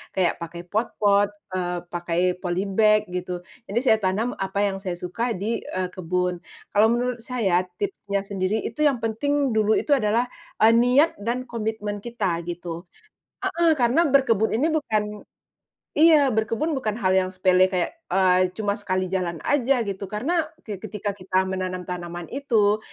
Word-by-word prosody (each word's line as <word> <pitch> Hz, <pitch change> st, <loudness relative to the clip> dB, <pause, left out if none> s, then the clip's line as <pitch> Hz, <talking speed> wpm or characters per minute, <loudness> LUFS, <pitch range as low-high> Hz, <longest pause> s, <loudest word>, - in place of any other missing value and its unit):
Kayak 180 Hz, -2 st, +1 dB
pakai 170 Hz, +1 st, -7 dB
pot-pot, 205 Hz, 0 st, +2 dB, 0.2 s
eee, 180 Hz, -1 st, -1 dB
pakai 175 Hz, 0 st, -2 dB, 0.2 s
polybag 200 Hz, +4 st, +2 dB
gitu. 180 Hz, 0 st, -4 dB, 0.2 s
Jadi 215 Hz, +4 st, 0 dB
saya 220 Hz, -4 st, +5 dB
tanam 200 Hz, +6 st, 0 dB
apa 195 Hz, +1 st, -1 dB
yang 195 Hz, -1 st, 0 dB
saya 185 Hz, -3 st, -3 dB
suka 225 Hz, +7 st, -2 dB
di, 220 Hz, +5 st, -2 dB
eee, 185 Hz, -1 st, -3 dB
kebun. 180 Hz, 0 st, -1 dB, 0.3 s
Kalau 210 Hz, +2 st, +5 dB
menurut 245 Hz, +1 st, 0 dB
saya, 215 Hz, -8 st, +1 dB, 0.2 s
tipsnya 205 Hz, -, -2 dB
sendiri 195 Hz, +1 st, -1 dB
itu 230 Hz, -, -6 dB
yang 290 Hz, -4 st, +4 dB
penting 275 Hz, +3 st, 0 dB
dulu 215 Hz, 0 st, +3 dB
itu 295 Hz, -, -2 dB
adalah, 235 Hz, -1 st, +2 dB, 0.4 s
eee, 225 Hz, -, +8 dB
niat 250 Hz, +7 st, +5 dB
dan 240 Hz, +4 st, -2 dB
komitmen 220 Hz, -3 st, -3 dB
kita 200 Hz, -7 st, -2 dB
gitu. 175 Hz, 0 st, -6 dB, 0.6 s
Heeh. 345 Hz, -4 st, +2 dB
Karena 255 Hz, +9 st, +4 dB
berkebun 245 Hz, -6 st, +3 dB
ini 280 Hz, +8 st, +2 dB
bukan 215 Hz, -9 st, -1 dB, 0.7 s
iya, 300 Hz, -4 st, +5 dB
berkebun 225 Hz, +8 st, 0 dB
bukan 235 Hz, -8 st, -1 dB
hal 190 Hz, -5 st, +1 dB
yang 185 Hz, 0 st, +2 dB
sepele 185 Hz, 0 st, +4 dB
kayak, 185 Hz, -, -2 dB
eee, 185 Hz, 0 st, +3 dB
cuma 205 Hz, -1 st, -1 dB
sekali 185 Hz, -2 st, -2 dB
jalan 175 Hz, -4 st, -2 dB
aja 270 Hz, -3 st, +2 dB
gitu. 200 Hz, -1 st, -5 dB
Karena 310 Hz, -, -1 dB, 0.2 s
ke 205 Hz, -4 st, -6 dB
ketika 210 Hz, 0 st, -4 dB
kita 185 Hz, -1 st, 0 dB
menanam 185 Hz, -1 st, -3 dB
tanaman 175 Hz, -1 st, -6 dB
itu, 220 Hz, -7 st, +2 dB
205 Hz, 155 wpm, -24 LUFS, 185-240 Hz, 0.7 s, eee